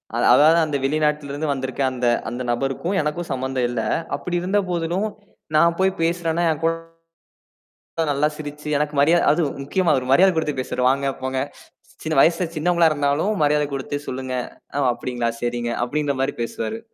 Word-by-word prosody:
அத 120 - +1
அதாவது 155 +4 +6
அந்த 150 -2 -1
வெளிநாட்டிலிருந்து 150 0 0
வந்திருக்க 130 0 -3
அந்த 125 -1 -1 0.2
அந்தநபருக்கும் 130 +9 -2
எனக்கும் 155 +3 -3
சம்பந்தம் 130 -1 -1
இல்லை. 115 -2 -2 0.3
அப்படி 175 -1 -4
இருந்த 190 +3 +1
போதிலும் 175 +4 -1 0.5
நான் 170 +2 +4
போய் 190 0 +3
பேசுறேன்ன்னா 170 0 0
என்கூட 165 +2 0 1.4
நல்லா 145 +2 +2
சிரிச்சு 150 0 -7
எனக்கு 150 +1 -1
மரியாதை 165 +4 +4
அதும் 155 -2 +1
முக்கியமா 170 +5 0
அவரு 130 -2 -1
மரியாதை 190 +6 +6
கொடுத்து 150 -3 -1
பேசுரே 125 0 -2
வாங்க 140 +1 0
போங்க. 130 0 -2 0.6
சின்ன 155 0 -2
வயசுல 170 +2 +3
சின்னவங்களா 170 +1 +3
இருந்தாலும் 145 +8 +1
மரியாதை 150 0 +3
கொடுத்து 135 +1 -3
சொல்லுங்க. 130 0 -4 0.4
அ - - -1
ஒ - - +3
அப்படிங்களா 120 -1 -3
சரிங்க 120 0 -2
அப்படின்ற 145 +2 -1
மாதிரி 135 +1 +1
பேசுவாரு. 110 -1 -4
150 Hz, 150 wpm, -22 LUFS, 130-165 Hz, 1.4 s, அதாவது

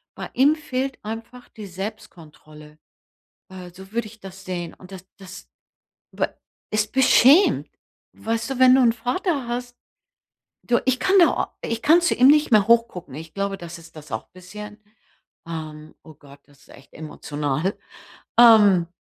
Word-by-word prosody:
Bei - - -8
ihm 285 +4 +3
fehlt 270 -3 -4
einfach 230 +3 -8
die 210 -2 -11
Selbstkontrolle. 155 -6 -11 0.7
Äh, 185 -1 -10
so 190 +2 -14
würde 235 -1 -2
ich 225 +1 -14
das 195 0 -13
sehen 175 -2 -5
und 185 +1 -16
das 185 -1 -10
das 195 0 -13 0.6
b - - -1 0.5
es 215 0 0
beschämt. 265 - +4 0.5
Weißt 225 +2 -3
du, 270 - -4
wenn 255 0 +6
du 265 - +4
n' 235 -2 +3
Vater 275 - -2
hast 245 0 -5 0.9
du 240 -1 +1
ich 255 -1 +1
kann 380 +5 +3
da 345 - +2
ich 230 0 -4
kann 330 +4 +5
zu 345 - +1
ihm 255 - +5
nicht 300 +1 +4
mehr 215 -3 +4
hoch 235 0 +4
gucken. 175 - -11
Ich 160 +4 -10
glaube, 200 0 -3
das 170 0 -9
ist 165 -1 -17
das 150 -2 -13
auch 110 - -6
bisschen, 210 +4 -11 0.7
ähm 155 -2 -8
oh 155 - -15
Gott, 140 -1 -18
das 145 -2 -24
ist - - -24
echt 135 - -18
emotional. 150 +2 -4 0.6
Ähm 205 -7 +6
210 Hz, 165 wpm, -22 LUFS, 170-245 Hz, 0.9 s, wenn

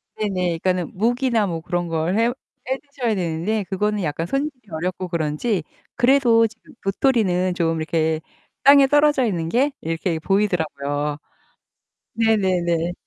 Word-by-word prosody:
네네. 185 -5 -1
그니까는 180 -1 -1
묵이나 235 +2 +1
뭐 165 -3 -3
그런 175 +1 -2
걸 165 +4 -1
해 230 +2 +3 0.4
해드셔야 265 -4 -2
되는데 180 +4 -1
그거는 210 +1 -1
약간 160 +1 -2
손질이 275 -1 -3
어렵고 180 +3 -3
그런지 170 +4 -1 0.3
그래도 240 -2 +4
지금 225 +1 -19
도토리는 195 -4 +1
좀 165 -2 0
이렇게 160 0 0 0.4
땅에 280 0 +7
떨어져 290 -1 +4
있는 170 -7 -1
게 260 - +2
이렇게 165 +1 -2
보이더라고요. 150 -7 -1 1.0
네네네. 180 -7 +1
185 Hz, 310 characters per minute, -22 LUFS, 165-230 Hz, 1.0 s, 땅에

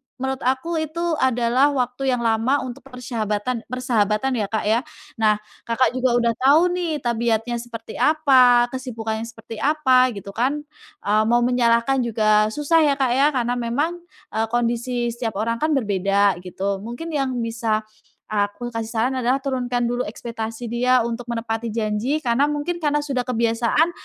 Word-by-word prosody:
menurut 265 0 -3
aku 315 +6 0
itu 315 +2 -3 0.2
adalah 255 +3 +2
waktu 250 +1 -1
yang 235 - -4
lama 230 +5 +1
untuk 255 0 -7
persyahabatan 230 -2 -3
persahabatan 245 -1 0
ya, 205 - -1
Kak, 220 +1 -2
ya. 220 +3 +2 0.4
Nah, 215 -1 +4 0.3
Kakak 235 +2 +2
juga 255 -1 +1
udah 235 -1 +3
tahu 310 +7 +5
nih 335 -5 -2
tabiatnya 235 0 0
seperti 230 -2 -8
apa, 260 -6 +5
kesibukannya 230 -4 -4
seperti 225 -1 -10
apa 265 -4 +4
gitu 200 0 -8
kan, 270 +7 -1 0.4
eee, 215 +1 +3
mau 240 +1 +3
menyalahkan 245 +1 +2
juga 215 -3 +3
susah 295 +8 +2
ya, 280 - +2
Kak, 265 -3 +1
ya, 275 +3 +4
karena 245 0 0
memang, 290 +9 -1 0.3
eee, 220 0 0
kondisi 240 +1 -1
setiap 230 -3 -4
orang 230 +3 -1
kan 310 -1 +1
berbeda 200 -4 +1
gitu. 190 +2 -3
Mungkin 240 +11 -7
yang 270 -4 -1
bisa 225 -1 -1 0.4
aku 210 +3 -2
kasih 225 -1 -3
saran 230 +3 0
adalah 250 +3 +2
turunkan 250 -3 -1
dulu 245 +1 -1
ekspektasi 230 +1 -6
dia 240 +1 +2
untuk 235 +1 -5
menepati 230 0 -3
janji 220 +5 -1
karena 260 +5 +2
mungkin 320 +4 -3
karena 295 -1 +1
sudah 270 -4 -1
kebiasaan 235 +5 +1
240 Hz, 155 wpm, -22 LUFS, 225-265 Hz, 0.4 s, tahu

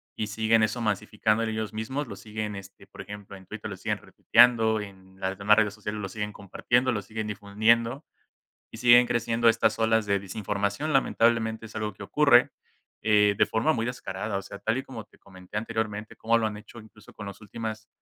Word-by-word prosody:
y 110 - -3
siguen 110 +1 +2
eso 120 +3 0
masificándole 110 +1 0
ellos 110 -2 -3
mismos, 130 +7 -3
lo 100 - -8
siguen, 105 0 -5
este, 100 0 -12
por - - -17
ejemplo, 100 -1 -9
en 95 - -16
Twitter - - -7
lo - - -6
siguen - - -2
retuiteando, 115 -3 +4
en 95 -2 -12
las 95 0 -3
demás 105 +1 +5
redes 105 -2 +2
sociales 105 0 -5
lo 95 - -4
siguen 105 +1 -4
compartiendo, 120 +6 0
lo 105 -4 -2
siguen 110 +2 -5
difundiendo, 110 +6 +1 0.6
y - - -10
siguen 120 0 +6
creciendo 115 0 +2
estas 115 -1 +2
olas 110 -1 +2
de 100 -1 +1
desinformación. 100 +8 -2
Lamentablemente 115 -3 +2
es 115 - -12
algo 105 -1 -3
que - - -10
ocurre, - - +4 0.5
eh, 105 -1 +4
de - - +4
forma 115 +8 +1
muy 115 0 -1
descarada, 105 -4 -4
o - - -3
sea, 100 +1 -10
tal 115 +2 0
y 135 - -3
como 115 -5 -9
te - - -25
comenté 95 +1 -10
anteriormente, 110 -1 -3
como 115 +1 +2
lo 115 - 0
han 105 -1 -3
hecho, 105 +3 -12
incluso 105 -1 -16
con 105 - -8
los 100 +1 -9
últimos, 110 0 -6
110 Hz, 200 wpm, -27 LUFS, 105-115 Hz, 0.6 s, siguen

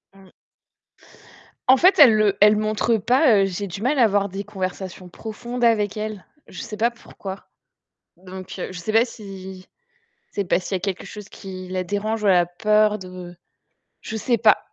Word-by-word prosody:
Mmh. 190 -1 -18 1.4
En 265 - +7
fait, 370 +5 +4
elle 250 -7 +9
le 210 -2 +3
elle 210 +1 +7
montre 215 +2 +1
pas, 245 +4 +4
heu, - - +3
j'ai 195 +1 -4
du 195 +3 -7
mal 270 +3 +1
à - - +6
avoir 200 -2 +1
des 195 +1 -6
conversations 185 -2 -6
profondes 235 +6 -6
avec 215 -3 +2
elle. 210 -3 -5 0.2
Je - - -9
sais 210 - -7
pas 230 +2 +2
pourquoi. 200 -5 -10 0.7
Donc 185 +1 -10
heu, - - -5
je 185 - -7
sais 195 +5 -4
pas 225 +1 +6
si 190 -5 -10 0.6
c'est 200 - -2
parce 180 +1 0
qu'il 195 - -2
y - - +1
a - - -8
quelque 195 -1 -3
chose 210 -1 -10
qui 185 -2 -9
la 185 0 -2
dérange 210 +4 -2
ou - - +2
elle 190 - +6
a 175 -1 +4
peur 210 +4 +2
de 180 -1 -9 0.7
je 220 - -6
sais 230 +2 0
pas. 215 -1 +5
205 Hz, 190 wpm, -22 LUFS, 185-220 Hz, 1.4 s, elle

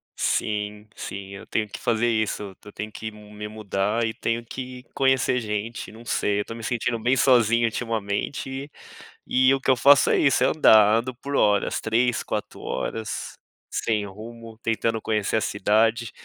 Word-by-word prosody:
Sim, 105 0 -1
sim. 100 0 -7
Eu 100 - -9
tenho 110 -1 -1
que - - -8
fazer 120 0 +1
isso. 105 -3 -1
Eu 105 - -11
tenho 110 +1 -6
que 110 +1 -6
me 105 0 -9
mudar 105 +1 -1
e 110 - -2
tenho 115 +1 -2
que 125 +1 -7
conhecer 130 -2 +2
gente. 110 0 -4
Não 115 +2 -13
sei, 105 -2 0
eu - - -5
tô 115 - -7
me 115 - -9
sentindo 120 0 -1
bem 125 +4 +2
sozinho 120 -2 +4
ultimamente 115 +5 -3 0.6
e 130 +1 +4
o 135 - +1
que - - -2
eu - - +5
faço 140 +3 +6
é - - +4
isso, 140 - +3
é - - +5
andar. 110 -8 +6
Eu 115 - +4
ando 125 +1 -5
por 140 +3 -5
horas, 105 -4 +2
3, 120 +2 +1
4 - - -4
horas, 110 +11 -4 0.4
sem 105 -2 0
rumo, 115 +3 -10
tentando 115 0 0
conhecer 110 0 0
a - - +1
cidade, 110 +4 +1
110 Hz, 175 wpm, -24 LUFS, 105-120 Hz, 0.6 s, faço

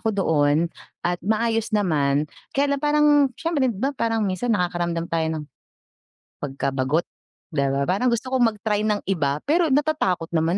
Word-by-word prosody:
ako 220 - 0
doon 160 -3 +2 0.3
at 175 0 0
maayos 225 +1 0
naman. 150 -7 +2 0.3
Kaya 280 +1 +2
lang - - -7
parang 300 0 +3 0.3
siyempre, 320 -5 0
'di 220 - -3
ba, 270 +7 -1
parang 225 -4 0
minsan 200 +5 -1
nakakaramdam 175 -2 -1
tayo 165 -1 0
ng, 150 - -5 1.0
pagka-bagot, 140 +2 -1 0.5
'di 140 -2 +1
ba? 135 +1 0
Parang 200 - +1
gusto 235 +3 -2
kong 240 -3 +4
mag-try 210 0 -1
ng 210 -1 0
iba, 145 -6 +1
pero 330 +3 +2
natatakot 275 - +1
naman 165 +3 +2
195 Hz, 160 wpm, -23 LUFS, 160-245 Hz, 1.0 s, kong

